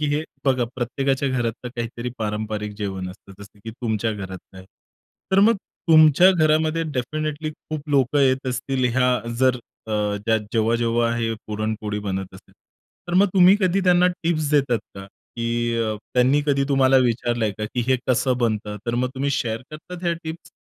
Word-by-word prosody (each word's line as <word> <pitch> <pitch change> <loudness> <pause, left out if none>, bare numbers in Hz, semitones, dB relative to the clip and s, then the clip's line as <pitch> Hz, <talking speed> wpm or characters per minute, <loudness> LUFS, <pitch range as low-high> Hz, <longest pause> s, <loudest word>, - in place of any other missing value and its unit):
की 150 - +1
हे 150 - 0 0.2
बघा 130 -3 +2
प्रत्येकाच्या 135 +2 -1
घरातलं 125 -1 -2
काहीतरी 120 +1 -4
पारंपरिक 105 -1 -3
जेवण 95 -3 -4
असतं, 100 +1 -15
जसं 100 +1 -14
की 115 - -5
तुमच्या 110 -1 -2
घरात 95 -2 -6 0.2
आहे. 95 0 -11 0.7
तर 190 - +5
मग 225 +3 +5 0.3
तुमच्या 155 +3 +7
घरामध्ये 155 -1 +2
डेफिनिटली 155 +4 -3
खूप 155 0 -8
लोकं 140 0 +2
येत 130 0 +2
असतील, 130 +1 -2
ह्या 125 -1 +3 0.2
जर 130 -1 +3 0.3
अ, 110 - -4 0.6
जेव्हा-जेव्हा 115 +1 +1
हे 115 -1 -1
पुरणपोळी 105 0 -3
बनत 95 -2 -4
असते. 95 - -16 0.6
तर 175 - -2
मग 200 - +5
तुम्ही 185 0 +7
कधी 185 +1 +2
त्यांना 180 0 +5 0.2
टिप्स 155 -3 0
देतात 140 -5 +2 0.2
का? 95 0 -9 0.3
की 115 - -2 0.7
त्यांनी 130 +3 +4
कधी 140 -1 +2
तुम्हाला 135 -1 +4
विचारलंय 120 -2 0
का 110 - -2
की 125 - 0
हे 130 - +3
कसं 130 0 +2
बनतं, 110 -3 -1
तर 120 - -1
मग 125 +1 0
तुम्ही 140 +2 -1
शेअर 115 -3 -2
करतात 170 +3 -9
हे 170 - +2
टिप्स? 160 +1 -7
125 Hz, 165 wpm, -22 LUFS, 110-150 Hz, 0.7 s, तुमच्या